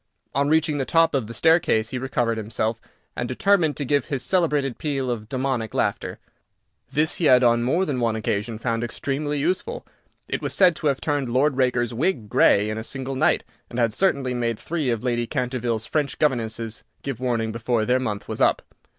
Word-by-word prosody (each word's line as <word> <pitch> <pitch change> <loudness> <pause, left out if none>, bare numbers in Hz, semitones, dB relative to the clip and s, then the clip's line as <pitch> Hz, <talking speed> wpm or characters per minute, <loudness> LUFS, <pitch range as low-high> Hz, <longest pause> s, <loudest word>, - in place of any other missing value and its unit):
On 140 +2 +1
reaching 155 -1 +2
the - - +1
top 165 +5 +3
of 130 -6 0
the 115 - -7
staircase 160 -8 +3
he 125 - -3
recovered 120 -3 -1
himself, 110 +1 -2 0.3
and 120 - -2
determined 160 +3 +2
to 145 - -2
give 140 0 +1
his 135 -4 -3
celebrated 150 -7 +1
peal 135 -4 -1
of 110 -2 -5
demoniac 130 -4 -2
laughter. - - -1 0.7
This 155 +1 +1
he 170 - 0
had 125 -3 +6
on 120 -1 +4
more 165 +10 +1
than 140 -6 -2
one 115 -2 +1
occasion 110 +1 -2
found 115 0 -1
extremely 145 +5 -2
useful. 185 - -2 0.4
It - - -3
was - - -2
said 180 -4 +5
to 155 - -1
have 140 -2 0
turned 145 -4 -1
Lord 135 +4 +2
Raker's 125 -2 +1
wig 120 - -1
grey 100 +1 +4
in 110 - -3
a - - -5
single 135 +2 -4
night, - - +2 0.3
and 120 - -7
had 115 -3 +2
certainly 140 - +1
made 120 -2 -1
three 155 -1 -2
of 115 -2 -1
Lady 120 -2 0
Canterville's 125 -4 -2
French 150 -3 -1
governesses 115 -5 -1 0.2
give 135 -4 -4
warning 115 -3 -1
before 115 0 0
their 125 +2 +2
month 105 -5 -3
was - - -5
up. - - +3
125 Hz, 195 wpm, -23 LUFS, 115-145 Hz, 0.7 s, had